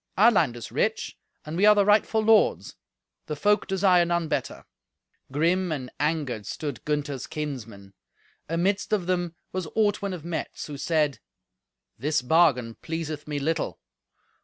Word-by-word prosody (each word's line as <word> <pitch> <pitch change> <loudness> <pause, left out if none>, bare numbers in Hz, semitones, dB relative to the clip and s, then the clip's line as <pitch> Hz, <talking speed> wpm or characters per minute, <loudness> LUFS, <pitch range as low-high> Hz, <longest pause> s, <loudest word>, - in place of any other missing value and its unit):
Our 220 +5 +7
land 155 - +2
is 120 - -8
rich, - - -1 0.3
and 155 +1 -5
we 200 +4 +4
are 210 - +8
the 205 -1 +4
rightful 215 +1 +3
lords. 220 0 +3 0.5
The 150 - -3
folk 205 +8 +2
desire 190 -2 +4
none 170 -1 0
better." - - -3 0.7
Grim 170 +5 +1
and 130 -5 -4
angered 145 -8 -1
stood 145 -7 -5
Gunther's 145 -3 -2
kinsmen. 115 -11 -6 0.6
Amidst 190 +6 0
of 195 -4 +1
them 175 -2 -1 0.2
was 185 -3 -3
Ortwin 205 -2 +1
of 165 -3 -7
Metz, 170 -1 -4
who 145 -2 -7
said, 150 -4 +1 0.8
"This 145 +1 0
bargain 125 -6 +3
pleaseth 160 -2 -5
me 150 -1 -3
little. 155 +3 -2
160 Hz, 145 wpm, -26 LUFS, 145-185 Hz, 0.8 s, are